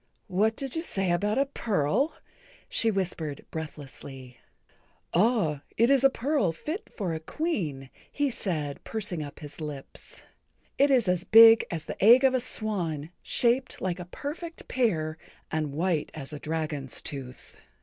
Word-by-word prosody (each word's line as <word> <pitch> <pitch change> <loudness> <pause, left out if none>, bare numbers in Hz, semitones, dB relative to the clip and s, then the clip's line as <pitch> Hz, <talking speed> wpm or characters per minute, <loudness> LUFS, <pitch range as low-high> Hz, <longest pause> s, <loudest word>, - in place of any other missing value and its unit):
"What 215 +4 +2
did 270 +2 -4
you 325 - 0
say 195 - 0
about 205 +6 +1
a 275 - +3
pearl?" 230 - 0 0.5
she 225 - +2
whispered 170 -7 -3
breathlessly. 135 -5 -8 0.7
"Ah, 180 - +2 0.2
it 235 +4 +4
is 275 -2 +4
a 270 - +8
pearl 265 - 0
fit 315 - -6
for 185 -6 -3
a 160 - -3
Queen," 155 - -3 0.2
he 285 -1 0
said, 155 -10 -3
pursing 205 -7 -3
up 145 +1 -8
his 150 +1 -9
lips. 145 -3 -8 0.6
"It 280 +1 +5
is 250 -6 +4 0.2
big 225 0 +8
as 165 -2 -4
the - - -5
egg 240 +5 +8
of 265 -1 +5
a 255 - +3
swan, 180 - -2
shaped 245 +2 +1
like 180 -1 -2
a 180 - -6
perfect 315 - -7
pear 160 -11 0 0.3
and 155 -2 -1
white 165 +1 0
as 145 -1 -6
a 150 - -6
dragon's 150 -5 -3
tooth. 135 -4 -7
185 Hz, 150 wpm, -28 LUFS, 150-240 Hz, 0.7 s, a